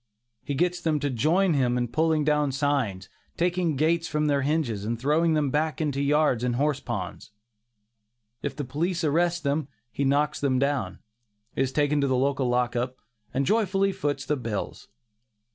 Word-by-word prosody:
He 140 - -3
gets 175 +4 0
them 155 -3 +1
to 145 -1 0
join 165 - +2
him 125 -3 +1
in 120 0 0
pulling 155 +4 +1
down 150 -1 +2
signs, 130 -9 -1 0.3
taking 175 -2 +1
gates 165 +4 +1
from 150 0 0
their 145 -2 +2
hinges 135 -8 -1
and 115 +2 -2
throwing 155 +5 +2
them 150 -1 +2
into 135 - -2
back 155 +1 0 0.2
yards 140 -3 +2
and 125 -1 0
horse 140 +1 +1
ponds. 115 -5 -5 1.1
If 140 -2 -3
the 145 -1 -4
police 170 +7 -2
arrest 170 +2 +1
them, 140 0 0 0.2
he 140 - -2
knocks 145 +2 +1
them 135 -2 +1
down, 140 -1 -1 0.5
is 135 0 0
taken 145 +1 +1
to 140 - +2
the 130 - +1
lock 125 -2 +1
up, 125 +2 -2 0.3
and 135 +1 0
joyfully 195 0 +2
foots 145 -5 -2
the 150 - 0
bills. 115 -5 -5
145 Hz, 170 wpm, -26 LUFS, 130-155 Hz, 1.1 s, join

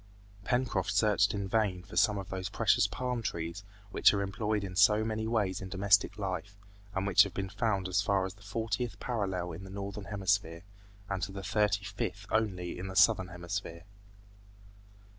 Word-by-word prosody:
Pencroft 120 -5 0
searched 105 -2 +3
in 100 -1 -2
vain 95 -4 0
for 90 - -12
some 105 +3 +4
of 95 -1 -6
those 95 -1 -4
precious - - +3
palm 125 -2 -3
trees 85 -1 -4 0.3
which - - +5
are 100 - 0
employed 105 +1 -1
in 95 -2 -6
so 105 +3 +5
many 110 0 -2
ways 105 -5 0
in 95 - -6
domestic 95 +1 +3
life, 100 0 -4 0.4
and 95 0 0
which 100 -3 +6
have 100 -1 +2
been 95 0 -3
found 100 -2 0
as 90 +2 +2
far 100 -1 +1
as 95 - -5
the 105 - -22
fortieth 115 +3 -3
parallel 95 -7 -2
in 85 +4 -8
the 95 - -9
Northern 100 +1 -6
Hemisphere, 95 -5 -1 0.4
and 95 -1 -3
to 95 - -3
the 95 0 -7
thirty 100 0 +1
fifth 100 -1 -4
only 95 -6 -1
in 95 - -5
the 95 - -7
Southern 95 -1 +5
Hemisphere. 90 -1 -5
100 Hz, 180 wpm, -31 LUFS, 95-105 Hz, 0.4 s, which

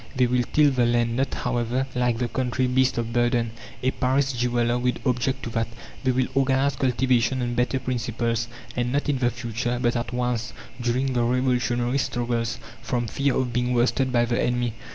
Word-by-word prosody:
They 130 -1 +4
will 125 0 +2
till 150 -2 +5
the 125 -3 +2
land 120 -1 +1
not, 135 +2 0
however, 125 0 -1
like 125 -2 +1
the 120 0 -1
country 130 +1 -1
beast 130 0 +2
of 115 0 -2
burden: 120 -1 +1 0.3
a 130 - +3
Paris 135 +1 +1
jeweller 120 0 +1
would 125 0 0
object 125 +1 0
to 115 - -4
that. 115 0 0 0.4
They 130 - +1
will 130 0 +2
organize 135 +1 +2
cultivation 130 0 +1
on 120 -1 -1
better 125 +2 +1
principles; 120 -2 -1 0.3
and 125 0 0
not 145 +2 0
in 140 -3 +1
the 120 -1 +3
future, 120 0 -3
but 120 0 +1
at 120 0 -2
once, 120 -2 -1 0.3
during 130 +3 0
the 120 - +1
revolutionary 125 +1 +1
struggles, 120 -2 -1 0.2
from 120 -1 -1
fear 140 +4 0
of 125 -2 -1
being 125 +1 +1
worsted 130 +2 +2
by 120 -1 +3
the 120 0 0
enemy. 120 -2 0
125 Hz, 190 wpm, -25 LUFS, 120-130 Hz, 0.4 s, till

